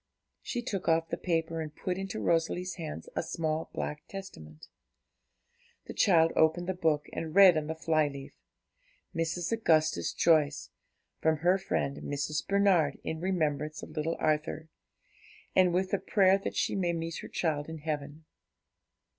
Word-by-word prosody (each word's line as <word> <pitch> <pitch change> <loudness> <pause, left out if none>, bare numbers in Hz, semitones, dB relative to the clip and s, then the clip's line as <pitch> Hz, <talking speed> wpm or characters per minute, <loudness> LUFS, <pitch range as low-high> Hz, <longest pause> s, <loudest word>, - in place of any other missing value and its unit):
She 240 -1 -4
took 195 -5 -4
off 165 0 +2
the - - -1
paper, 165 -2 -1
and 155 -1 -7
put 180 - -3
into 195 0 -4
Rosalie's 170 +2 0
hands 155 - -7
a - - +1
small 160 -1 -2
black 150 0 -5
Testament. 80 - -10 1.2
The - - -7
child 165 -4 +4
opened 160 +2 +3
the 190 - 0
book, 160 -4 +1
and 160 0 -5
read 195 -3 +8
on 155 -1 -1
the 160 - -3
fly 160 -2 +1
leaf, 140 -1 -8 0.8
'Mrs. 165 +3 -1
Augustus 155 - +2
Joyce. 155 -3 +2 0.5
From 160 0 +2
her 180 +4 +3
friend 140 -7 -2
Mrs. 145 +1 -3
Bernard, 195 -8 +3
in 160 - -4
remembrance 155 -5 -1
of - - -9
little 155 +1 -2
Arthur, 155 +1 -1 0.9
and 185 -1 +5
with 185 +2 0
the 200 - +1
prayer 195 -2 +3
that - - -5
she - - 0
may 175 -3 0
meet 165 -1 -4
her - - -8
child 155 -3 -2
in 160 - -6
heaven.' 150 0 -5
160 Hz, 155 wpm, -30 LUFS, 155-180 Hz, 1.2 s, read